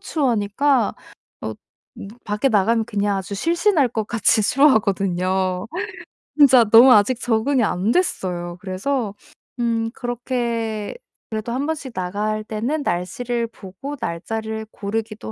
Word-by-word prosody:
추워하니까 260 -1 +1 0.5
어 - - -4 0.5
뭐 - - -7 0.2
밖에 210 +6 0
나가면 225 +1 +2
그냥 205 -1 -1
아주 195 +1 -5
실신할 335 - +2
것 220 -2 -3
같이 225 -1 +2
추워하거든요. 190 -7 +2 0.7
진짜 265 -4 +7
너무 240 +4 +9
아직 215 +4 +3
적응이 245 +3 +1
안 200 +2 0
됐어요. 175 - -1
그래서 200 +3 -2 0.4
음 230 -1 0
그렇게 235 -3 -3 0.4
그래도 220 +2 -3
1 275 +3 -1
번씩 300 -5 -4
나갈 210 +4 -2
때는 240 +8 -2
날씨를 230 +7 -2
보고 225 +6 -8
날짜를 220 +5 -4
고르기도 215 - -4
220 Hz, 270 characters per minute, -21 LUFS, 200-250 Hz, 0.7 s, 너무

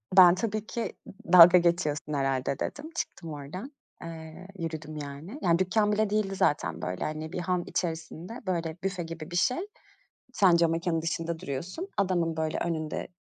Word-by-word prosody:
Ben 180 -2 +9
tabii 215 +2 -2
ki 235 - -3 0.4
d - - -2
dalga 175 0 +11
geçiyorsun 170 -4 +1
herhâlde 135 -1 0
dedim, 295 +2 -4
çıktım 165 - -4
oradan, 160 - -7 0.3
eee, 165 +2 -9
yürüdüm 155 -2 -5
yani. 150 - -7
Yani 170 0 +3
dükkân 210 +3 +2
bile 215 0 +1
değildi 210 -2 0
zaten. 90 - +1
Böyle, 90 +2 -3
hani, 155 +1 -4
bir - - -2
han 180 0 0
içerisinde, 165 +5 -4
böyle, 165 -3 -1
büfe 190 -2 -2
gibi 165 0 -8
bir - - -4
şey. 215 +8 +2 0.8
Sen 185 -7 +5
camekânın 165 0 +1
dışında 165 0 -2
duruyorsun, 170 - -5
adamın, 175 -4 +1
böyle, 160 0 -1
önünde 160 -2 -2
170 Hz, 160 wpm, -28 LUFS, 155-185 Hz, 0.8 s, dalga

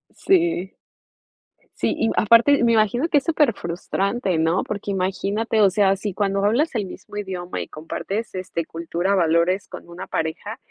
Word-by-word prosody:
Sí. 340 - +1 1.1
Sí, - - 0
y 225 - +1
aparte 235 +6 +5
me 235 - +4
imagino 230 - +2
que 295 - +3
es 280 - 0
superfrustrante, 200 - 0
¿no?, 165 +3 +1
porque 205 -1 -4
imagínate, 200 +4 -1
o 200 - +6
sea, 195 0 +2
si 205 -1 -4
cuando 195 0 0
hablas 270 +9 +2
el 210 -4 -1
mismo 195 +2 -10
idioma 185 -3 -5
y - - -6
compartes, 195 +8 -5
este, 185 -2 -3
cultura, 170 +4 -2
valores 175 +1 +2
con - - -11
una 170 +1 -8
pareja, 160 +8 -3
200 Hz, 155 wpm, -22 LUFS, 180-225 Hz, 1.1 s, o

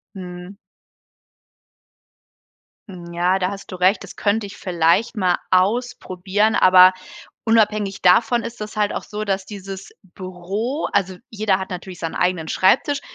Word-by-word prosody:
Mhm. 180 +1 -9 2.6
Ja, 180 +2 +1
da 185 0 -1
hast 200 0 -9
du 185 - -6
recht. 185 +3 +2
Das - - -12
könnte 205 0 0
ich 200 - -11
vielleicht 175 +5 +1
mal 185 -3 +2
ausprobieren. 205 0 0
Aber 185 0 +7 0.5
unabhängig 215 -3 +1
davon 225 +6 +4
ist 235 -1 -8
das 215 0 -8
halt 205 -1 +1
auch - - -3
so, 210 0 -5
dass 195 -1 -2
dieses 195 -1 -9
Büro 190 - -5
also 190 -2 0
jeder 210 -3 0
hat 190 - -6
natürlich 180 0 -7
seinen 165 - -5
eigenen 180 -3 -1
Schreibtisch, 270 +9 +2
195 Hz, 135 wpm, -20 LUFS, 185-215 Hz, 2.6 s, Aber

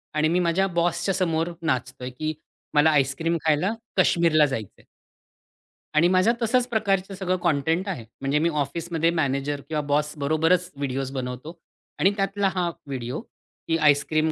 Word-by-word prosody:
आणि 155 0 +3
मी 180 - +2
माझ्या 180 +3 +2
बॉसच्या 175 +3 +1
समोर 165 -2 0
नाचतोय, 130 -4 -2
की 155 +5 -3 0.4
मला 150 +2 +6
आईस्क्रीम 150 +4 +1
खायला 160 +7 +2 0.2
काश्मीरला 170 -4 +4
जायचंय. 115 -8 -6 1.1
आणि 155 +3 +5
माझ्या 185 +5 +4
तशाच 245 +2 +2
प्रकारचं 195 -4 0
सगळं 185 -1 -1
कॉटेंट 160 +6 +1
आहे, 150 - -4 0.2
म्हणजे 140 +2 +1
मी 165 +2 +2
ऑफिसमध्ये 165 +3 -1
मॅनेजर 140 0 -1
किंवा 155 -1 0
बॉसबरोबरच 155 +4 +1
व्हिडिओज 135 -1 -2
बनवतो 130 +5 -5 0.4
आणि 190 +5 +4
त्यातला 195 0 +1
हा 180 -2 +1 0.2
व्हिडिओ, 130 - -4 0.5
की 165 - +2
आईस्क्रीम 155 +1 +3
160 Hz, 140 wpm, -24 LUFS, 140-180 Hz, 1.1 s, मला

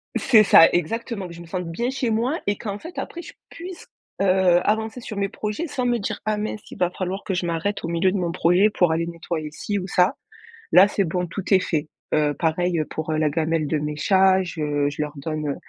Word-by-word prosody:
C'est 220 -5 +5
ça 165 - +8
exactement, 200 +3 -2
que 170 - -10
je 170 - -10
me - - -10
sente 180 0 -4
bien 235 +9 -1
chez 260 -3 -1
moi 240 +8 0
et 205 - +1
qu'en 205 -2 -5
fait 335 +2 -10
après 345 - -5
je - - -11 0.2
puisse, 355 +1 -9 0.3
heu, - - +3 0.4
avancer 220 +3 -1
sur 215 -3 -7
mes 200 -1 0
projets 215 +11 -4
sans 255 -3 -3
me 240 -1 +1
dire: 200 - -4
«Ah 215 -1 0
mince, 210 0 -4
il - - -9
va 180 - +2
falloir 185 +2 -4
que 190 - -3
je 175 - -1
m'arrête 170 +5 -2
au - - -3
milieu 170 +2 +1
de 200 - -1
mon 175 -2 -1
projet 180 +4 +3
pour 175 -5 +2
aller 165 +1 0
nettoyer 165 -2 -5
ci 205 +6 -3
ou 185 0 -4
ça». 185 0 +2 0.6
Là 185 +3 +8
c'est 200 -1 0
bon, 180 +1 -2
tout 180 +3 -5
est 190 - +7
fait. 155 -4 -2 0.2
Heu, 150 -1 +2
pareil, 170 +2 0
heu, 155 - 0
pour, 155 0 -4
heu, 155 - 0
la 155 -1 +2
gamelle 160 0 0
de 155 - 0
mes 150 0 -3
chats, 190 +2 +4
je 150 -4 -1
je 145 +1 -5
leur 150 0 -3
donne, 155 +1 -4
heu, 140 - -2
180 Hz, 245 wpm, -23 LUFS, 160-210 Hz, 0.6 s, ça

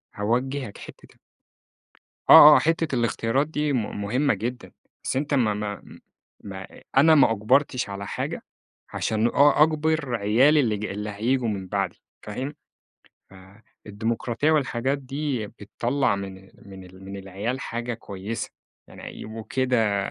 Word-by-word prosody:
هاوجهك 125 +2 -2
حتة - - -12
ال - - -31 1.1
آه، 150 0 +11
آه، - - +5
حتة 165 -3 0
الاختيارات 120 +3 0
دي 150 -2 -1
م - - +1
م - - -7
مهمة 130 +8 +1
جدًا. 125 +2 -5 0.3
بس - - -2
أنتَ 145 +2 -1
ما-ما 105 -6 -1 0.6
ما 95 -1 -8
أ - - -15
أنا 160 +4 +7
ما 140 -6 +5
أُجبرتش 125 +4 +1
على 100 0 -6
حاجة، - - -4 0.5
عشان 110 +1 0
أ 145 +4 +4
أَجبر 155 -4 +1
عيالي 125 +9 +4
اللي 110 -5 +1
ج 105 - -6
اللي 105 +1 -5
هييجوا 120 +4 0
من 95 -3 -4
بعدي، - - -3 0.2
فاهم؟ 130 +7 -5 0.8
فالديمقراطية 110 +6 -4
والحاجات 135 -2 0
دي 135 -3 -3
بتطلّع 120 +4 -2
من 95 -1 -8 0.2
من 95 -1 -11
ال 95 +1 -15
من 100 +1 -7
العيال 100 +7 -4
حاجة 120 0 -4
كويسة، 105 0 -6 0.4
يعني - - -13
هيبقوا 110 0 -8
كده 125 -6 +1
115 Hz, 140 wpm, -24 LUFS, 105-140 Hz, 1.1 s, آه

